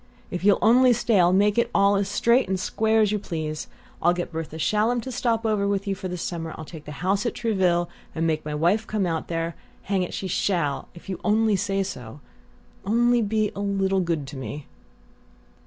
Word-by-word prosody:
If 180 -1 -4
you'll 200 0 +5
only 245 +3 +6
stay 230 -3 +2
I'll 175 0 +5
make 205 +4 +3
it - - +1
all 200 0 +4
as 200 0 0
straight 235 +4 +3
and 190 -1 0
square 220 +3 +1
as 210 -2 +3
you 210 - 0
please. 155 -5 -4 0.3
I'll 175 +1 +3
get 175 -1 -4
Bertha 160 -1 -5
Shallum 215 +8 +1
to 260 - -6
stop 230 -2 0
over 210 -2 +1
with 200 0 -1
you 200 - -1
for 190 0 -5
the 180 0 -4
summer; 165 -2 -4
I'll 160 - -7
take 155 -1 -11
a - - -6
house 195 +2 +2
at - - -3
Trouville 185 -7 +1 0.3
and 165 0 0
make 155 -1 0
my 150 0 -4
wife 175 +9 +1
come 210 -3 0
out 165 -2 -2
there. 165 0 -2 0.3
Hang 195 -1 0
it, 180 - -3
she 190 - -4
SHALL, 170 -6 0
if 170 - -14
you 185 -3 -4 0.4
say 195 +1 0
so! 130 - -8 0.6
Only 240 +4 +3
be 215 0 0
a - - -6
little 195 -1 +1
good 165 -5 -1
to 140 - -8
me!" 140 +2 -6
195 Hz, 210 wpm, -24 LUFS, 165-215 Hz, 0.6 s, only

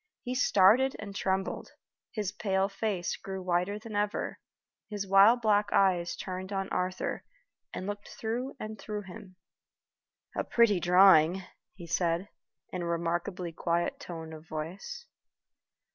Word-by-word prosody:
He 250 - -3
started 250 +2 +4
and 200 -2 -8
trembled; 190 -1 -2 0.4
his 210 -4 -2
pale 195 -2 0
face 195 -3 -2
grew 190 0 -6
whiter 180 +3 0
than 215 0 -8
ever; 205 +1 -1 0.5
his 205 -2 -3
wild 200 +5 +6
black 205 -1 +3
eyes 180 -3 +3
turned 185 +1 -6
on 195 -1 -2
Arthur, 185 +1 -2 0.5
and 185 - -5
looked 205 0 -5
through 240 +4 -4
and 215 -1 -6
through 210 -1 -5
him. 185 0 -11 1.0
"A - - 0
pretty 230 -5 +3
drawing," 180 0 +6 0.3
he 175 -2 -9
said, 170 +3 0 0.4
in 180 - -4
a - - -3
remarkably 170 +2 -2
quiet 170 +1 -1
tone 160 -2 -7
of 155 0 -11
voice. 165 - -6
190 Hz, 135 wpm, -30 LUFS, 175-210 Hz, 1.0 s, wild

